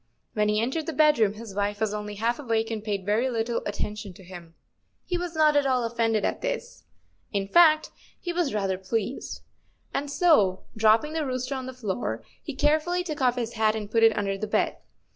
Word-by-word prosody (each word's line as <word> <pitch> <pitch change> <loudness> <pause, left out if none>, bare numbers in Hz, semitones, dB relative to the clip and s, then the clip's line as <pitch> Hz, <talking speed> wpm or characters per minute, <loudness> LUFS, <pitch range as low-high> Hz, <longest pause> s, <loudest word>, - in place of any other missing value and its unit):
When 210 -1 +1
he 210 0 +2
entered 265 +8 -1
the 325 - -2
bed 305 -4 +4
room 210 -2 +3
his 215 -1 -9
wife 205 +1 -1
was 220 -1 0
only 210 0 -5
half 230 +5 0
awake 225 -4 -1
and 215 -2 -4
paid 200 -3 -3
very 220 +6 +1
little 230 -1 -1
attention 205 -1 -4
to 190 - -15
him. 175 -2 -11 0.5
He 360 - -2
was 350 -1 -3
not 305 -1 +4
at 285 -1 +3
all 255 -2 +2
offended 225 -2 +1
at - - -2
this—in 485 - -6
fact, 310 0 +5 0.3
he 350 - -4
was 345 -5 0
rather 195 -3 -1
pleased—and 230 +6 -5
so, 280 - +3
dropping 225 +7 +3
the 320 -1 -1
rooster 255 -1 -2
on 260 -1 -4
the - - -4
floor, 190 - -3 0.2
he 295 - -6
carefully 310 +5 +2
took 305 -5 -5
off 250 -2 +3
his 235 -2 -3
hat 220 -1 +2
and 210 -1 -5
put 225 - +3
it 225 -1 +5
under 195 -1 -1
the 215 - -3
bed. - - 0
230 Hz, 200 wpm, -26 LUFS, 210-295 Hz, 0.5 s, fact